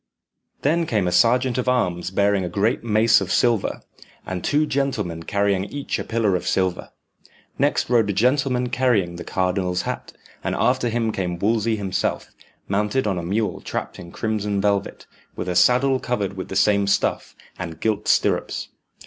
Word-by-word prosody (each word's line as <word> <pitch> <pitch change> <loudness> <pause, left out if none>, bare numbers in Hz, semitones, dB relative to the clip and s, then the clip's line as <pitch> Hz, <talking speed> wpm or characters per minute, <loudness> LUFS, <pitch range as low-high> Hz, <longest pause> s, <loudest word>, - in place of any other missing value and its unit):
Then 165 +3 +2
came 105 -8 +1
a - - 0
sergeant 120 +6 +3
of 125 - 0
arms 90 -9 0
bearing 100 0 +1
a 90 - -3
great 105 +8 0
mace 110 -1 +4
of 95 - -3
silver, 120 -4 +1 0.4
and 90 -2 -4
two 150 +1 +2
gentlemen 115 - -2
carrying 100 +1 0
each 140 +7 -4
a - - -3
pillar 110 -4 0
of 90 - -3
silver. 95 -2 0 0.7
Next - - +1
rode 115 -4 +3
a - - +1
gentleman 125 +3 +1
carrying 105 -10 +1
the 90 - -6
cardinal's 90 -1 -1
hat, - - -5 0.3
and - - -1
after 125 -1 +1
him 115 -1 0
came 90 -4 -3
Wolsey 110 +3 +1
himself, 95 -3 -2 0.4
mounted 105 +6 0
on 95 -4 0
a - - -5
mule 100 +2 -1
trapped - - -5
in 85 - -10
crimson 105 -2 -2
velvet, 100 0 -1 0.3
with - - -5
a 90 - -2
saddle 125 +8 +4
covered 105 -7 -2
with 95 - -5
the - - -6
same 100 0 +3
stuff, 100 - 0 0.2
and 85 -3 -6
gilt 110 -2 -1
stirrups. - - +1
105 Hz, 170 wpm, -22 LUFS, 95-120 Hz, 0.7 s, mace